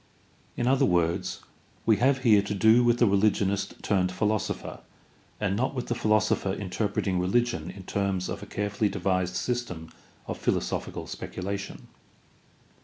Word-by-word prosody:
In 120 - 0
other 135 +2 +3
words, 85 -5 +1 0.4
we 110 -2 +4
have 130 +3 +2
here 110 -5 +6
to 100 +1 -3
do 110 +4 +5
with 120 0 +3
the 120 - +4
religionist 100 -1 +1
turned 95 -3 +1
philosopher 105 +3 -2 0.6
and 100 -2 0
not 130 +5 -1
with 125 - -4
the - - +2
philosopher 105 -3 +1
interpreting 100 -1 -1
religion 95 -2 0
in 95 +1 -9
terms 95 -1 -1
of - - -5
a - - -9
carefully 105 +1 -1
devised 95 -2 -1
system 90 -9 -3 0.3
of - - -5
philosophical - - -2
speculation. 95 +1 -6
100 Hz, 140 wpm, -27 LUFS, 95-115 Hz, 0.6 s, here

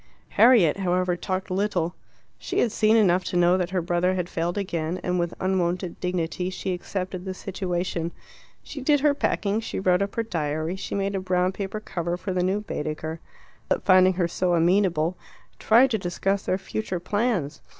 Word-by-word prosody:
Harriet, 225 -10 +5
however, 180 -1 +1
talked 185 +2 -3
little. 185 -3 0 0.5
She - - -4
had 230 - +2
seen 220 +1 +3
enough 185 -4 +3
to 180 - -1
know 175 +1 +5
that 180 -2 -1
her 185 -2 -1
brother 175 +2 +1
had 180 -1 -2
failed 170 +3 -2
again, 170 -3 -2
and 180 0 0
with 170 0 -2
unwonted 180 -1 -1
dignity 180 0 -2
she 185 0 -3
accepted 185 0 -4
the 190 -1 -5
situation. 180 -3 -3 0.5
She 285 - -8
did 290 +1 +3
her 295 0 +4
packing, 210 -6 0
she 225 - -4
wrote 185 -1 +2
up 200 0 -2
her 230 - 0
diary, 155 -3 -2
she 190 - -5
made 200 0 -1
a 195 - -1
brown 185 0 +1
paper 195 +2 -4
cover 175 -4 -3
for 190 +1 -4
the 180 - 0
new 190 +3 0
Baedeker. 155 -3 -4 0.5
Philip, - - 0
finding 185 0 +6
her 175 -1 0
so 175 +1 0
amenable, 175 -1 +2 0.4
tried 245 +4 +5
to 220 - +1
discuss 190 +2 -1
their 185 - +2
future 195 -2 -4
plans. 185 - -1
185 Hz, 180 wpm, -25 LUFS, 175-200 Hz, 0.5 s, finding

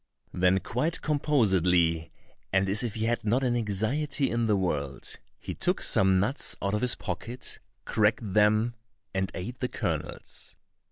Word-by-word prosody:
Then 90 +1 +3
quite 155 +7 -1
composedly, 90 - +2 0.4
and 95 0 +2
as 100 +3 +2
if 120 -4 -3
he 110 0 -1
had 120 +1 0
not 120 +5 +1
an 120 -2 +1
anxiety 120 +7 0
in 115 -1 +1
the 105 - +3
world, 70 -7 -2 0.2
he - - -6
took - - 0
some 95 -1 +4
nuts 115 +10 0
out 100 0 -1
of 105 - 0
his 125 -1 +3
pocket, 105 +6 -5 0.3
cracked 105 -1 +1
them, 105 +3 +3 0.4
and 95 -1 -1
ate 120 +8 -6
the 125 - -1
kernels. - - -4
105 Hz, 155 wpm, -28 LUFS, 95-120 Hz, 0.4 s, some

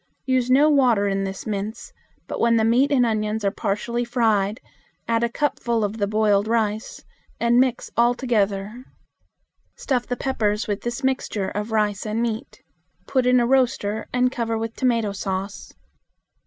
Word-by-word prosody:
Use 255 -2 +1
no 275 +4 +5
water 250 -9 +3
in 195 0 -1
this 195 0 -6
mince, 210 +1 -5 0.3
but - - -5
when 230 0 +3
the 220 - +2
meat 255 +5 +3
and 255 -3 +4
onions 215 -1 -1
are 200 - +2
partially 235 +5 -2
fried 225 -3 +1 0.5
add 230 0 +1
a 235 - +1
cupful 235 -4 -1
of 205 +2 -2
the 200 - +1
boiled 210 -1 +2
rice, 220 -1 -1 0.4
and 235 +1 +3
mix 255 -2 0
all 240 +1 +3
together. 215 -2 -1 0.9
Stuff 250 -3 -1
the 245 - -3
peppers 215 -5 -1
with 205 -1 -2
this 240 +3 -4
mixture 255 -7 -1
of 210 +2 -4
rice 210 -2 0
and 215 +1 -2
meat. 230 -2 -4 0.4
Put 260 -2 +1
in 250 0 +5
a 240 - +2
roaster 240 -5 +1
and 250 0 +2
cover 230 -3 -2
with 225 0 -4
tomato 230 -5 +1
sauce. 195 0 -5
230 Hz, 165 wpm, -23 LUFS, 210-245 Hz, 0.9 s, no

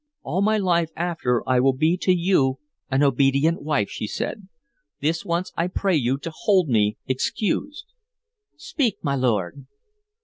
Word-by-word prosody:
"All 190 - -1
my 215 +2 +3
life 170 -5 +1
after 160 -8 -1
I 130 -1 +3
will 135 +1 +3
be 160 +5 +3
to 185 - +1
you 170 -7 +2 0.3
an 135 +2 +2
obedient 140 +4 +2
wife," 145 -9 0
she 105 - -5
said. 200 - -5 0.5
"This 160 +3 -1
once 175 -1 -2
I 170 - 0
pray 190 0 0
you 130 -2 +1
to 165 - -5
hold 185 -3 +2
me 105 -3 +2
excused.... 220 - -2 0.7
Speak, 235 - -1
my 140 -3 0
lord." 120 -2 -1
155 Hz, 150 wpm, -23 LUFS, 130-180 Hz, 0.7 s, my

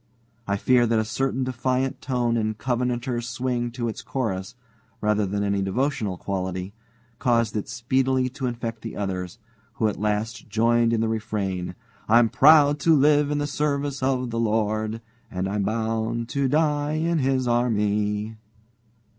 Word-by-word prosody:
I 100 0 0
fear 120 +3 +3
that 115 0 +2
a 110 - +1
certain 130 +3 -1
defiant 130 +1 -1
tone 120 -3 0
and 110 -2 -1
Covenanter's 125 0 -1
swing 120 0 -1
to 120 -1 -2
its 110 - -5
chorus, 95 -7 -3 0.4
rather 105 -1 +1
than 100 +2 -1
any 100 -1 0
devotional 105 -1 -1
quality, 95 0 -4 0.5
caused 115 -3 +1
it 105 - -3
speedily 130 +2 +1
to 130 0 -4
infect 115 -2 -4
the 115 - -7
others, 95 -1 -3 0.4
who 110 - +1
at 105 - -3
last 105 +3 -2
joined 115 +2 +3
in 115 -1 +1
the 115 - +1
refrain: 100 -5 -3 0.3
"I'm 115 +1 +6
proud 145 +1 +6
to 165 0 +4
live 145 0 +4
in 150 - 0
the 145 - 0
service 145 -1 -1
of 130 -2 0
the 115 - -2
Lord, 110 0 0 0.3
And 95 0 -3
I'm 100 +1 -1
bound 115 +2 -1
to 140 -1 0
die 150 +1 +1
in 165 +1 +1
His 130 -2 +1
army." 105 -2 0
115 Hz, 155 wpm, -24 LUFS, 105-130 Hz, 0.5 s, I'm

